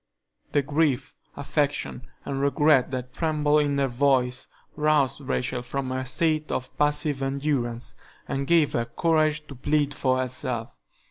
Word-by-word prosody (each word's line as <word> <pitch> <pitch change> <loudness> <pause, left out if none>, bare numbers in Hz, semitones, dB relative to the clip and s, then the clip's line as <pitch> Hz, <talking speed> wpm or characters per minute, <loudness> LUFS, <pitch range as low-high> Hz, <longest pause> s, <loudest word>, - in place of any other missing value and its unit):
The 145 - +3
grief, 145 -2 0 0.2
affection, 140 - -2 0.2
and 135 -1 -2
regret 140 -1 +3
that 125 -1 -5
trembled 150 -2 +2
in 145 -1 0
her 140 -1 +2
voice 130 -1 +1 0.3
roused 150 -3 +2
Rachel 125 -2 -2
from 130 +1 -4
her 130 0 -2
state 155 +3 0
of 130 0 -4
passive 150 -1 +1
endurance 135 -4 -2 0.3
and 135 0 -2
gave 165 -3 +4
her 115 - 0
courage 155 +4 +1
to 145 - -10
plead 145 +2 0
for 130 -3 +1
herself. 125 -2 -2
140 Hz, 140 wpm, -25 LUFS, 130-150 Hz, 0.3 s, gave